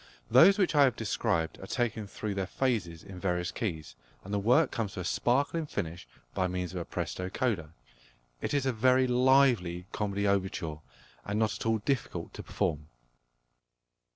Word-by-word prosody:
Those 190 Hz, -, +7 dB
which 190 Hz, -5 st, +2 dB
I 145 Hz, -2 st, +6 dB
have 125 Hz, -5 st, +1 dB
described 80 Hz, -1 st, -1 dB
are 95 Hz, -, -9 dB
taken 115 Hz, -3 st, -2 dB
through 105 Hz, +1 st, -4 dB
their 95 Hz, -1 st, -2 dB
phases 100 Hz, -11 st, -1 dB
in 95 Hz, -2 st, -10 dB
various 90 Hz, -2 st, -1 dB
keys, 80 Hz, -, -4 dB, 0.3 s
and 100 Hz, -, -7 dB
the 100 Hz, -, +1 dB
work 125 Hz, +9 st, +3 dB
comes 110 Hz, -5 st, -3 dB
to 95 Hz, -, -5 dB
a -, -, -5 dB
sparkling 140 Hz, -, +1 dB
finish 85 Hz, -, -5 dB, 0.3 s
by 95 Hz, -1 st, 0 dB
means 90 Hz, 0 st, -3 dB
of 90 Hz, -, -3 dB
a -, -, -6 dB
presto 90 Hz, 0 st, -4 dB
coda. 95 Hz, -9 st, -1 dB, 0.7 s
It -, -, -2 dB
is 140 Hz, -2 st, +1 dB
a 130 Hz, -, +1 dB
very 130 Hz, +3 st, +4 dB
lively 125 Hz, -8 st, +3 dB
comedy 100 Hz, -1 st, -1 dB
overture, 95 Hz, -5 st, -1 dB, 0.5 s
and 100 Hz, -, -3 dB
not 110 Hz, -1 st, +1 dB
at -, -, -4 dB
all 110 Hz, 0 st, +3 dB
difficult 125 Hz, +3 st, -3 dB
to -, -, -7 dB
perform. 75 Hz, -1 st, -2 dB
100 Hz, 175 wpm, -30 LUFS, 90-125 Hz, 0.7 s, Those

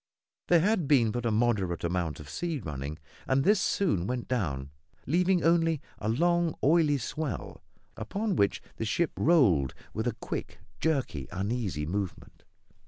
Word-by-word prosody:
There 175 Hz, -2 st, +5 dB
had 195 Hz, -4 st, +1 dB
been 125 Hz, -7 st, +4 dB
but 120 Hz, +1 st, -2 dB
a -, -, +1 dB
moderate 105 Hz, -6 st, +1 dB
amount 85 Hz, -4 st, -1 dB
of 75 Hz, -, -10 dB
sea 165 Hz, -, -3 dB
running, 75 Hz, -, -5 dB, 0.3 s
and 135 Hz, +1 st, +2 dB
this 205 Hz, +3 st, +4 dB
soon 100 Hz, -, +1 dB
went 125 Hz, 0 st, -3 dB
down, 70 Hz, -, -2 dB, 0.3 s
leaving 180 Hz, +4 st, +2 dB
only 165 Hz, -2 st, +3 dB, 0.2 s
a 105 Hz, -, -2 dB
long, 170 Hz, +6 st, +2 dB
oily 150 Hz, -1 st, +4 dB
swell, 150 Hz, +1 st, -4 dB, 0.3 s
upon 200 Hz, -, -2 dB
which 100 Hz, -7 st, +1 dB
the 115 Hz, -, -2 dB
ship 160 Hz, +9 st, +1 dB
rolled 105 Hz, -, +3 dB, 0.2 s
with 110 Hz, +3 st, -2 dB
a 120 Hz, -, -1 dB
quick, -, -, -5 dB, 0.2 s
jerky, 135 Hz, -, -1 dB
uneasy 100 Hz, -5 st, -2 dB
movement. 95 Hz, +1 st, -5 dB
120 Hz, 150 wpm, -29 LUFS, -, 0.3 s, There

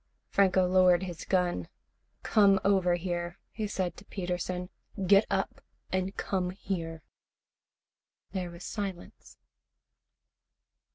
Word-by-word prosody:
Franco 190 Hz, -2 st, +4 dB
lowered 180 Hz, 0 st, +5 dB
his 175 Hz, -3 st, -6 dB
gun. 175 Hz, -, +1 dB, 0.6 s
"Come 200 Hz, -2 st, +5 dB
over 190 Hz, -3 st, +4 dB
here," 175 Hz, 0 st, -3 dB
he 215 Hz, -1 st, -3 dB
said 185 Hz, -3 st, -2 dB
to 205 Hz, -, -12 dB
Peterson. 180 Hz, -1 st, -3 dB, 0.3 s
"Get 200 Hz, +3 st, +6 dB
up 195 Hz, 0 st, -1 dB, 0.3 s
and 185 Hz, +1 st, -1 dB
come 185 Hz, -2 st, -1 dB
here." 165 Hz, -4 st, -4 dB, 1.3 s
There 185 Hz, -2 st, -3 dB
was 170 Hz, +1 st, -10 dB
silence. 195 Hz, -4 st, -6 dB
185 Hz, 105 wpm, -30 LUFS, 175-195 Hz, 1.3 s, Get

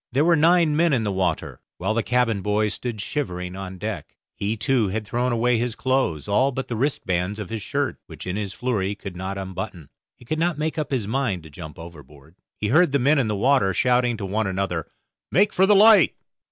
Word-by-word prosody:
There 140 Hz, +5 st, +2 dB
were 170 Hz, 0 st, +5 dB
nine 165 Hz, 0 st, +4 dB
men 165 Hz, 0 st, +3 dB
in 120 Hz, -4 st, +1 dB
the 105 Hz, -, -1 dB
water, 95 Hz, -1 st, -2 dB, 0.2 s
while 95 Hz, +4 st, -1 dB
the 115 Hz, -, +1 dB
cabin 120 Hz, -4 st, +1 dB
boy 105 Hz, +1 st, +1 dB
stood 110 Hz, +1 st, -5 dB
shivering 90 Hz, -10 st, -4 dB
on 95 Hz, -1 st, -7 dB
deck. -, -, -6 dB, 0.2 s
He, 105 Hz, +2 st, -2 dB
too, 115 Hz, 0 st, +1 dB
had 105 Hz, +3 st, -3 dB
thrown 120 Hz, +4 st, -1 dB
away 120 Hz, 0 st, +2 dB
his 120 Hz, -1 st, -2 dB
clothes, 130 Hz, -, 0 dB
all 130 Hz, +7 st, +2 dB
but 135 Hz, 0 st, -5 dB
the 120 Hz, -, -2 dB
wrist 135 Hz, +5 st, -1 dB
bands 90 Hz, +3 st, -1 dB
of 105 Hz, -2 st, -7 dB
his 110 Hz, -2 st, -3 dB
shirt, -, -, -2 dB
which -, -, -10 dB
in 90 Hz, +1 st, -3 dB
his 100 Hz, -2 st, -3 dB
flurry 110 Hz, -2 st, -1 dB
he 100 Hz, -, -3 dB
could 100 Hz, -3 st, -8 dB
not 95 Hz, +2 st, -4 dB
unbutton. 95 Hz, -4 st, -6 dB, 0.3 s
He 120 Hz, -, -18 dB
could 155 Hz, +6 st, -2 dB
not 170 Hz, -1 st, +1 dB
make 155 Hz, +1 st, -2 dB
up 150 Hz, -, -2 dB
his 125 Hz, -7 st, -1 dB
mind 110 Hz, -7 st, -1 dB
to 80 Hz, -, -13 dB
jump 75 Hz, -1 st, -10 dB
overboard. 75 Hz, -3 st, -13 dB, 0.2 s
He 105 Hz, -, -2 dB
heard 155 Hz, +3 st, +4 dB
the -, -, +5 dB
men 140 Hz, +3 st, +3 dB
in 125 Hz, -, +1 dB
the 105 Hz, -, -1 dB
water 105 Hz, -4 st, +2 dB
shouting 125 Hz, -2 st, +2 dB
to 100 Hz, -, -5 dB
one 105 Hz, +3 st, -1 dB
another, 95 Hz, -4 st, -2 dB, 0.4 s
"Make 200 Hz, +3 st, +3 dB
for 190 Hz, +1 st, +4 dB
the 210 Hz, -, +6 dB
light." 210 Hz, -3 st, +6 dB
110 Hz, 230 wpm, -23 LUFS, 95-135 Hz, 0.4 s, the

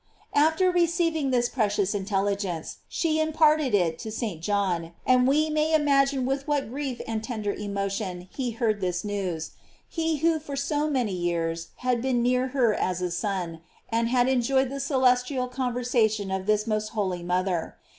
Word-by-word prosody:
After 320 Hz, +5 st, +4 dB
receiving 335 Hz, -4 st, +1 dB
this 245 Hz, -2 st, +2 dB
precious 205 Hz, -5 st, 0 dB
intelligence, 195 Hz, -3 st, -2 dB
she 315 Hz, -2 st, 0 dB
imparted 310 Hz, -4 st, +3 dB
it 165 Hz, -4 st, +1 dB
to 220 Hz, -, -6 dB
St. 215 Hz, -7 st, -4 dB
John, 175 Hz, -3 st, -1 dB
and 255 Hz, 0 st, +4 dB
we 300 Hz, +3 st, +3 dB
may 310 Hz, +1 st, +2 dB
imagine 275 Hz, -3 st, +3 dB
with 270 Hz, +2 st, -2 dB
what 290 Hz, -6 st, 0 dB
grief 270 Hz, -2 st, -4 dB
and 220 Hz, -1 st, -2 dB
tender 215 Hz, -3 st, -2 dB
emotion 200 Hz, -2 st, -3 dB
he 260 Hz, -3 st, -2 dB
heard 225 Hz, -3 st, -1 dB
this 180 Hz, -1 st, -1 dB
news; 185 Hz, -6 st, -3 dB, 0.4 s
he 325 Hz, -1 st, -1 dB
who 325 Hz, +2 st, +2 dB
for 285 Hz, -2 st, -6 dB
so 295 Hz, +2 st, 0 dB
many 250 Hz, -8 st, 0 dB
years 170 Hz, -2 st, -2 dB, 0.2 s
had 250 Hz, -2 st, +2 dB
been 250 Hz, -2 st, +1 dB
near 250 Hz, +1 st, +2 dB
her 250 Hz, -4 st, +2 dB
as 185 Hz, -3 st, -1 dB
a 180 Hz, -, -1 dB
son, 175 Hz, -3 st, -3 dB, 0.3 s
and 230 Hz, 0 st, +1 dB
had 245 Hz, 0 st, +3 dB
enjoyed 265 Hz, +1 st, +2 dB
the 275 Hz, -, -4 dB
celestial 255 Hz, -1 st, +2 dB
conversation 245 Hz, -5 st, 0 dB
of 190 Hz, 0 st, -3 dB
this 210 Hz, 0 st, +2 dB
most 215 Hz, -1 st, -1 dB
holy 190 Hz, -5 st, -1 dB
mother. 180 Hz, -1 st, -1 dB
235 Hz, 165 wpm, -26 LUFS, 195-275 Hz, 0.4 s, After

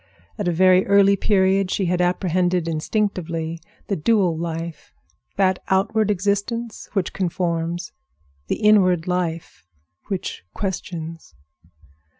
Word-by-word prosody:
At 205 Hz, -, -1 dB
a -, -, +3 dB
very 185 Hz, +2 st, +5 dB
early 200 Hz, 0 st, +5 dB
period 195 Hz, -1 st, +2 dB
she 190 Hz, -, 0 dB
had 180 Hz, 0 st, +1 dB
apprehended 180 Hz, -1 st, +1 dB
instinctively 165 Hz, -1 st, -2 dB, 0.2 s
the 200 Hz, -, -1 dB
dual 185 Hz, 0 st, +2 dB
life—that 170 Hz, +3 st, -4 dB
outward 200 Hz, +3 st, +1 dB
existence 205 Hz, +4 st, -2 dB
which 195 Hz, -4 st, -1 dB
conforms, 170 Hz, -2 st, -2 dB, 0.6 s
the -, -, -2 dB
inward 185 Hz, -6 st, +4 dB
life 175 Hz, -, -3 dB, 0.4 s
which 190 Hz, -, -4 dB
questions. 165 Hz, -, -5 dB
185 Hz, 105 wpm, -22 LUFS, 170-200 Hz, 0.6 s, very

